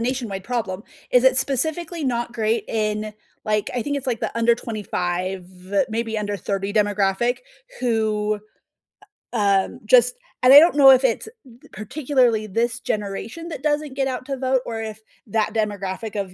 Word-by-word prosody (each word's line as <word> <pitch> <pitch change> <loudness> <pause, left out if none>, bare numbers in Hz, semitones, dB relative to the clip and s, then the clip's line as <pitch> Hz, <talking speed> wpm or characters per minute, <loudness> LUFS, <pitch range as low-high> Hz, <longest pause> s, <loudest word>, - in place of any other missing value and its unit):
nationwide 230 -6 -3
problem. 210 -5 -3 0.3
Is 250 0 +4
it 260 0 +5
specifically 315 +5 -1
not 240 -2 -1
great 225 0 0
in, 215 -1 -2 0.3
like, 215 -1 0
I 245 - 0
think 285 +4 -2
it's, 275 - -5
like, 240 -4 -1
the - - -3
under 230 0 +4
25, 185 -5 -3 0.4
maybe 225 0 -2
under 205 -1 -3
30 195 +1 -3
demographic, 205 +2 +1 0.4
who, 215 -3 0 0.9
u 235 - -1
um, 200 -2 +1
just - - +5 0.3
and 255 +1 +8
I 285 - +13
don't 330 +1 +4
know 280 -2 +8
if 260 0 +5
it's 255 - 0 0.2
b 245 -1 -18
particularly 245 0 0
this 230 +4 -1
generation 225 +7 -4
that 295 -5 -7
doesn't 295 -2 -1
get 270 -1 0
out 255 -1 -4
to 275 -1 -4
vote 260 0 +1
or 225 -1 -4
if, 220 -1 -6 0.3
that 215 +1 0
demographic 210 -1 -3
of 190 -2 -5
230 Hz, 165 wpm, -22 LUFS, 210-260 Hz, 0.9 s, I